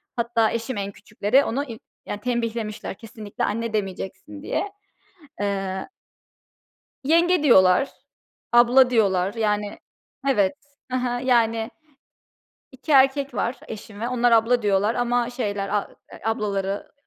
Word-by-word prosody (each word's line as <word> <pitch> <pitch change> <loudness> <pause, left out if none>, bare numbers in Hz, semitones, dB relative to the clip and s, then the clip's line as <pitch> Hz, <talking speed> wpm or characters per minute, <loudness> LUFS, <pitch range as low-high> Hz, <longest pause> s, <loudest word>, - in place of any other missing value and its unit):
Hatta 235 -2 +1
eşim 230 0 -3
en 200 0 -3
küçükleri 210 +6 +1
onu 275 +5 -1
i 230 -4 -9 0.3
ya, 205 - -4
tembihlemişler 230 -4 -3
kesinlikle 215 -2 -7
"anne" 230 +1 -1
demeyeceksin 210 +9 -4
diye. 400 +6 -2 0.7
Eee 195 -2 -2 1.2
"Yenge" 335 +2 +3
diyorlar, 190 0 +5 0.6
"abla" 245 +2 +6
diyorlar, 195 -5 +2
yani, 210 -2 -1 0.5
evet, 205 -5 +3 0.4
hı 255 - +1
hı, 245 -1 -1
yani, 230 -2 +2 1.0
2 270 +4 -4
erkek 270 0 +4
var 235 +5 -1
eşim 215 -1 -9
ve 235 - -1
onlar 245 -1 +2
"abla" 230 +1 +4
diyorlar 205 +2 +2
ama 245 0 0
şeyler 205 -5 -3
a 205 -1 -1 0.2
eee, - - -11
ablaları 200 -3 -2
230 Hz, 125 wpm, -23 LUFS, 205-250 Hz, 1.2 s, abla